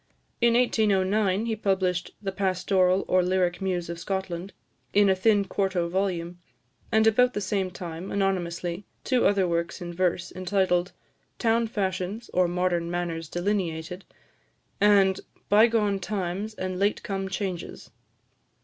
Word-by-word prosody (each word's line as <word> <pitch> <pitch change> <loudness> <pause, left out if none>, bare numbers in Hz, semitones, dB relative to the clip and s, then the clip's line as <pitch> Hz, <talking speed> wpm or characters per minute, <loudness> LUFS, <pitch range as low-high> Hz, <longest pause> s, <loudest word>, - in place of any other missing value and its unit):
In 235 0 +4
1809, 210 -3 +2
he 225 -1 -1
published 185 -4 -1
"The 195 - -2
Pastoral, 185 -1 +1
or 185 - +4
Lyric 180 0 0
Muse 180 -3 -1
of 170 0 -6
Scotland," 190 0 -4 0.4
in 205 -1 +5
a - - +3
thin 205 +1 +3
quarto 190 -3 -1
volume; 175 -2 -2 0.5
and 220 -1 +4
about 245 +3 +4
the - - 0
same 195 -1 -1
time, 175 0 -7
anonymously, 180 -2 -1 0.2
two 255 -2 +3
other 195 -2 +2
works 170 0 -2
in 175 -1 -6
verse, 180 0 0
entitled 185 -1 +1 0.5
"Town 230 0 +2
Fashions, 195 +1 -3
or 180 0 +3
Modern 175 -1 0
Manners 170 -2 -3
Delineated," 175 -2 -2 0.8
and 200 -2 +5 0.3
"Bygone 210 -2 +4
Times 200 +2 -3
and 185 -1 -4
Late 205 +1 +1
come 195 -4 -3
Changes." 190 -2 -5
190 Hz, 130 wpm, -26 LUFS, 180-205 Hz, 0.8 s, in